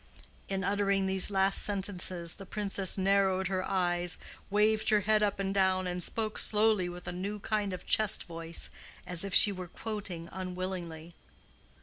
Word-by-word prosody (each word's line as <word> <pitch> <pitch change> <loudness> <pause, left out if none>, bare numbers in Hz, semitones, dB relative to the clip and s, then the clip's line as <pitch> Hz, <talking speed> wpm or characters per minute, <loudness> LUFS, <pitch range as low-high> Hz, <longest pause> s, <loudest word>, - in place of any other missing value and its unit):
'" - - -27
In 195 0 -2
uttering 200 -1 0
these 190 0 +4
last 195 0 +2
sentences 185 -4 +1
the 195 - -10
Princess 200 -2 +3
narrowed 190 -1 +1
her 185 -1 -2
eyes, 175 -2 0 0.3
waved 215 +2 +2
her 210 -1 +3
head 215 +1 +2
up 205 -1 -1
and 195 0 -2
down, 190 -1 +1
and 180 0 -4
spoke 215 +2 -2
slowly 210 -4 +3
with 175 0 -10
a - - -3
new 195 +4 -5
kind 210 -1 -2
of 185 - -8
chest 215 -2 +4
voice, 165 -1 -4 0.3
as 180 -1 -1
if 195 -2 -2
she 205 - +7
were 185 -2 -7
quoting 190 -4 -7
unwillingly. 180 -3 -6
190 Hz, 165 wpm, -29 LUFS, 180-205 Hz, 0.3 s, she